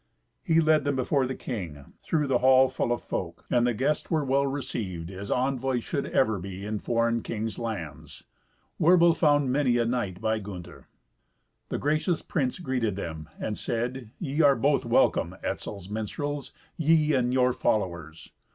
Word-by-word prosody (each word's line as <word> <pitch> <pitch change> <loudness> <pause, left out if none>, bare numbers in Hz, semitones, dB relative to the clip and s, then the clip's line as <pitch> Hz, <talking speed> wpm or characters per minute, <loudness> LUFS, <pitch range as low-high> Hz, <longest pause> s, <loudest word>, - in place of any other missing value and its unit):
He 165 0 +3
led 155 -2 +4
them 145 0 0
before 130 +1 +1
the 130 - -4
king, 85 - -6
through 155 -3 0
the 130 -3 +2
hall 130 +1 +6
full 130 - -1
of 120 - -1
folk, 85 -2 -5
and 120 -1 +3
the 120 - +1
guests 140 +6 0
were 155 -3 +1
well 140 +1 +2
received, 105 -11 -4
as 100 +2 -7
envoys 130 -1 0
should 140 -4 -2
ever 110 -6 +2
be 95 +2 -7
in 105 0 -2
foreign 115 0 +1
kings' 110 -2 -4
lands. 80 - -6 0.6
Werbel 170 0 +6
found 145 -4 +3
many 130 -3 +2
a 120 - +2
knight 115 -7 -2
by 110 0 0
Gunther. 95 -4 -9 0.8
The - - -2
gracious 155 +3 0
prince 130 -5 -1
greeted 125 - -1
them, 80 -5 -6
and 105 - -3
said, 120 0 -3
"Ye 150 -1 -1
are 140 -2 +6
both 140 -2 +1
welcome, 120 - +2
Etzel's 100 -3 -4
minstrels, 135 +7 -4 0.3
ye 155 -1 +3
and 125 -2 +2
your 125 -1 +3
followers. 85 -9 -2
125 Hz, 165 wpm, -27 LUFS, 105-140 Hz, 0.8 s, hall